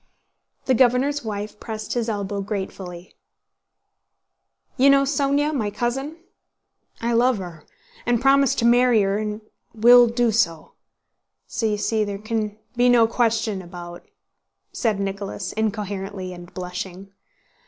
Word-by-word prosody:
The 260 Hz, -, +3 dB
governor's 255 Hz, +4 st, +2 dB
wife 210 Hz, -1 st, -5 dB
pressed 215 Hz, -2 st, -5 dB
his 235 Hz, -1 st, -1 dB
elbow 200 Hz, -1 st, -3 dB
gratefully. 190 Hz, -3 st, -6 dB, 1.6 s
"You 275 Hz, +1 st, +5 dB
know 275 Hz, 0 st, +5 dB
Sónya, 285 Hz, +2 st, +1 dB
my 220 Hz, -8 st, -1 dB
cousin? 270 Hz, +8 st, -3 dB, 0.8 s
I 235 Hz, +1 st, -1 dB
love 245 Hz, +1 st, +3 dB
her, 175 Hz, -5 st, -9 dB, 0.4 s
and 240 Hz, -1 st, +1 dB
promised 275 Hz, +1 st, +3 dB
to 235 Hz, -, +1 dB
marry 240 Hz, -2 st, +5 dB
her, 195 Hz, +1 st, 0 dB
and 210 Hz, 0 st, -4 dB, 0.3 s
will 240 Hz, +2 st, +7 dB
do 235 Hz, 0 st, +1 dB
so.... 170 Hz, -8 st, 0 dB, 0.7 s
So 225 Hz, -, -2 dB
you 210 Hz, -1 st, 0 dB
see 215 Hz, +1 st, 0 dB
there 200 Hz, -1 st, -4 dB
can 215 Hz, 0 st, -3 dB, 0.2 s
be 245 Hz, +1 st, +4 dB
no 240 Hz, -2 st, +6 dB
question 225 Hz, -3 st, 0 dB
about—" 175 Hz, -1 st, -10 dB, 0.6 s
said 220 Hz, -5 st, -1 dB
Nicholas 195 Hz, -2 st, -4 dB
incoherently 200 Hz, -3 st, -3 dB
and 175 Hz, 0 st, -11 dB
blushing. 185 Hz, +1 st, -7 dB
220 Hz, 130 wpm, -23 LUFS, 195-245 Hz, 1.6 s, will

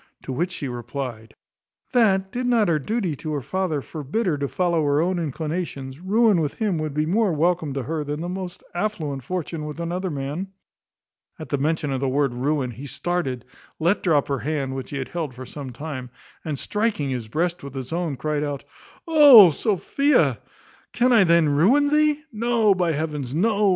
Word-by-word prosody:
To 130 Hz, -, -5 dB
which 175 Hz, +8 st, -1 dB
she 150 Hz, -6 st, -5 dB
replied, 120 Hz, -2 st, -6 dB, 0.6 s
"That, 195 Hz, -6 st, +3 dB
did 250 Hz, 0 st, -2 dB
not 230 Hz, -6 st, +3 dB
her 155 Hz, -2 st, +2 dB
duty 190 Hz, -, -2 dB
to 155 Hz, +2 st, -4 dB
her 145 Hz, -, -2 dB
father 180 Hz, -3 st, -2 dB
forbid 155 Hz, -, -3 dB
her 175 Hz, -5 st, +1 dB
to 140 Hz, -, -1 dB
follow 170 Hz, 0 st, 0 dB
her 145 Hz, 0 st, +2 dB
own 180 Hz, +2 st, +1 dB
inclinations, 150 Hz, -3 st, -4 dB
ruin 205 Hz, 0 st, +3 dB
with 150 Hz, -2 st, -2 dB
him 205 Hz, -7 st, -1 dB
would 155 Hz, -2 st, -3 dB
be 150 Hz, 0 st, +1 dB
more 200 Hz, +4 st, +2 dB
welcome 165 Hz, -1 st, +1 dB
to 135 Hz, -, -2 dB
her 155 Hz, +3 st, -3 dB
than 145 Hz, +1 st, -4 dB
the 170 Hz, -, -4 dB
most 180 Hz, 0 st, -6 dB
affluent 175 Hz, -8 st, -2 dB
fortune 165 Hz, +1 st, -4 dB
with 150 Hz, +2 st, -7 dB
another 180 Hz, +3 st, -2 dB
man." 145 Hz, +5 st, -4 dB, 0.9 s
At 155 Hz, -, -9 dB
the 140 Hz, -, 0 dB
mention 155 Hz, 0 st, 0 dB
of 135 Hz, -, -1 dB
the 135 Hz, 0 st, 0 dB
word 140 Hz, -1 st, +1 dB
ruin, 130 Hz, +1 st, -1 dB
he 130 Hz, +5 st, -9 dB
started, 140 Hz, -3 st, -2 dB, 0.3 s
let 170 Hz, +5 st, +1 dB
drop 155 Hz, -6 st, +2 dB
her 140 Hz, -2 st, -1 dB
hand, 140 Hz, -2 st, -2 dB
which 130 Hz, -1 st, -6 dB
he 140 Hz, -, -4 dB
had 135 Hz, -, -4 dB
held 160 Hz, -7 st, -4 dB
for 130 Hz, +1 st, -8 dB
some 135 Hz, 0 st, -7 dB
time, 130 Hz, -1 st, -6 dB, 0.3 s
and 150 Hz, -3 st, -3 dB
striking 210 Hz, -, -1 dB
his 120 Hz, -4 st, -4 dB
breast 170 Hz, +8 st, -1 dB
with 140 Hz, -1 st, -9 dB
his 130 Hz, +2 st, -5 dB
own, 165 Hz, -5 st, -2 dB
cried 150 Hz, 0 st, -1 dB
out, 145 Hz, -2 st, -4 dB, 0.4 s
"Oh, 285 Hz, -, +9 dB
Sophia! 200 Hz, -, +1 dB, 0.5 s
can 250 Hz, +1 st, +3 dB
I 215 Hz, -5 st, +6 dB
then 170 Hz, -2 st, +4 dB
ruin 210 Hz, -, +4 dB
thee? 300 Hz, 0 st, +3 dB
No; 230 Hz, -2 st, +2 dB
by 180 Hz, -3 st, +1 dB
heavens, 150 Hz, -3 st, -3 dB
no! 205 Hz, +3 st, +3 dB
160 Hz, 190 wpm, -23 LUFS, 140-190 Hz, 0.9 s, Oh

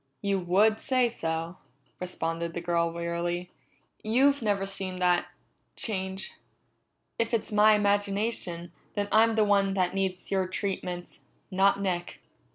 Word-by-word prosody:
"You 200 Hz, -1 st, +1 dB
would 200 Hz, +5 st, +3 dB
say 255 Hz, -2 st, +2 dB
so," 165 Hz, -5 st, -3 dB, 0.4 s
responded 165 Hz, -2 st, -3 dB
the -, -, -1 dB
girl 170 Hz, -1 st, 0 dB
wearily. 170 Hz, +1 st, -3 dB, 0.5 s
"You've 270 Hz, +6 st, +3 dB
never 205 Hz, -3 st, 0 dB
seen 195 Hz, -1 st, -3 dB
that 180 Hz, -1 st, +2 dB, 0.5 s
change. 190 Hz, -5 st, -3 dB, 0.9 s
If 230 Hz, +1 st, +1 dB
it's 220 Hz, -, -3 dB
my 210 Hz, +1 st, +6 dB
imagination, 200 Hz, -4 st, 0 dB, 0.2 s
then 205 Hz, -1 st, -1 dB
I'm 225 Hz, +1 st, +5 dB
the 220 Hz, -, +4 dB
one 200 Hz, -1 st, +2 dB
that 180 Hz, -1 st, +1 dB
needs 190 Hz, -2 st, -2 dB
your 190 Hz, -1 st, +1 dB
treatments, 180 Hz, -2 st, -4 dB, 0.3 s
not 195 Hz, +1 st, +3 dB
Nick." 180 Hz, -3 st, -2 dB
195 Hz, 130 wpm, -28 LUFS, 175-210 Hz, 0.9 s, my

